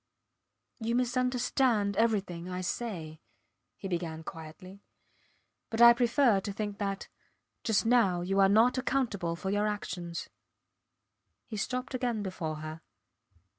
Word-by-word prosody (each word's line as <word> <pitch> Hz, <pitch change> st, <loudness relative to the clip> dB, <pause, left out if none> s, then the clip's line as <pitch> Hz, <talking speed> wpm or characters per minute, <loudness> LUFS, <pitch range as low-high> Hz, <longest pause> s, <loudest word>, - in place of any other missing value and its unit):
You 230 Hz, +1 st, -1 dB
misunderstand 250 Hz, -3 st, +1 dB
everything 195 Hz, -6 st, 0 dB
I 180 Hz, 0 st, -3 dB
say, 175 Hz, -6 st, -4 dB, 0.6 s
he 195 Hz, -, -6 dB
began 170 Hz, -3 st, -3 dB
quietly, 185 Hz, +4 st, -10 dB, 0.9 s
but 225 Hz, -, -3 dB
I 235 Hz, 0 st, +10 dB
prefer 240 Hz, -2 st, +3 dB
to 200 Hz, +1 st, -4 dB
think 205 Hz, 0 st, -4 dB
that 195 Hz, -1 st, -3 dB, 0.6 s
just 220 Hz, -1 st, +2 dB
now 225 Hz, -7 st, +3 dB
you 195 Hz, +3 st, 0 dB
are 195 Hz, 0 st, +6 dB
not 230 Hz, +5 st, +4 dB
accountable 225 Hz, -11 st, -1 dB
for 190 Hz, +3 st, -3 dB
your 205 Hz, +1 st, +1 dB
actions. 175 Hz, -5 st, -4 dB, 1.2 s
He 220 Hz, -, -7 dB
stopped 250 Hz, +5 st, -3 dB
again 245 Hz, -4 st, -1 dB
before 170 Hz, -5 st, -4 dB
her. 155 Hz, +1 st, -7 dB
205 Hz, 125 wpm, -30 LUFS, 180-235 Hz, 1.2 s, I